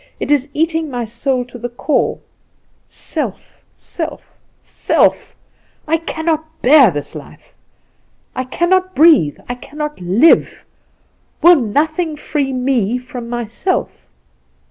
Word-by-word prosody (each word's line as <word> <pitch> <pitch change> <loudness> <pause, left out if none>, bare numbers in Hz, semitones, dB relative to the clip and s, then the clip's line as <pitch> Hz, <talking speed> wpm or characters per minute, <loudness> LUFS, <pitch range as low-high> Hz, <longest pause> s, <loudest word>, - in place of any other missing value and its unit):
It - - -3
is 285 -1 +2
eating 320 +1 -1
my 245 -3 -3
soul 245 +3 -2
to 245 -1 -12
its 240 0 -5
core 305 - 0 0.7
self, - - -5
self, 325 -2 -7 0.3
self! - - 0 0.5
I 325 +2 +2
cannot 320 -1 -3
bear 270 -3 +7
this 145 -4 -5
life! - - -12 0.8
I 255 - -2
cannot 370 +7 0
breathe, 300 - +5
I 245 - -3
cannot 300 +1 -7
live! 200 - +3 0.8
Will 350 +2 +9
nothing 310 - 0
free 295 -2 -2
me 250 -3 0
from 250 -2 -8
myself?" 240 - -2
280 Hz, 115 wpm, -17 LUFS, 245-320 Hz, 0.8 s, Will